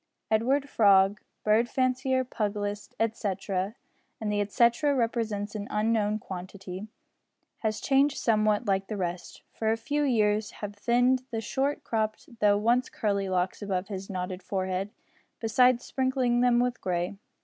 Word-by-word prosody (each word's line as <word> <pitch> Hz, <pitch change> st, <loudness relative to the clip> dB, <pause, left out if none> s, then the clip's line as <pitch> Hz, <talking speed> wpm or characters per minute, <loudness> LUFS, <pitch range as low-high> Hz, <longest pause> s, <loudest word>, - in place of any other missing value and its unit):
Edward 260 Hz, +6 st, +2 dB
Frog, 200 Hz, -4 st, +4 dB, 0.2 s
bird 220 Hz, +3 st, +3 dB
fancier, 260 Hz, 0 st, +1 dB
pugilist, 205 Hz, -3 st, -3 dB
etcetera, 205 Hz, -2 st, -1 dB, 0.4 s
(and 215 Hz, -1 st, -2 dB
the 205 Hz, 0 st, +1 dB
etcetera 235 Hz, +8 st, +2 dB
represents 225 Hz, -4 st, -1 dB
an 205 Hz, -2 st, -5 dB
unknown 210 Hz, 0 st, +1 dB
quantity), 190 Hz, 0 st, -7 dB, 0.7 s
has 215 Hz, -1 st, -1 dB
changed 275 Hz, +1 st, +2 dB
somewhat 215 Hz, -1 st, +2 dB
like 195 Hz, -1 st, 0 dB
the 215 Hz, -, -4 dB
rest, 175 Hz, -2 st, -5 dB
for 220 Hz, -1 st, 0 dB
a 225 Hz, -, +1 dB
few 290 Hz, +6 st, -1 dB
years 215 Hz, -6 st, +2 dB
have 205 Hz, -1 st, -6 dB
thinned 245 Hz, +4 st, +2 dB
the 225 Hz, -, -3 dB
short 270 Hz, +6 st, -1 dB
cropped 220 Hz, +3 st, -3 dB
though 205 Hz, -1 st, +4 dB
once 240 Hz, +4 st, +2 dB
curly 200 Hz, -2 st, -1 dB
locks 185 Hz, +2 st, -1 dB
above 195 Hz, -1 st, -2 dB
his 195 Hz, -1 st, -6 dB
knotted 185 Hz, -1 st, -4 dB
forehead, 190 Hz, 0 st, -2 dB, 0.5 s
besides 250 Hz, +2 st, +3 dB
sprinkling 260 Hz, -2 st, +1 dB
them 245 Hz, -1 st, +4 dB
with 245 Hz, 0 st, 0 dB
grey. 180 Hz, +1 st, -1 dB
215 Hz, 140 wpm, -28 LUFS, 200-240 Hz, 0.7 s, Frog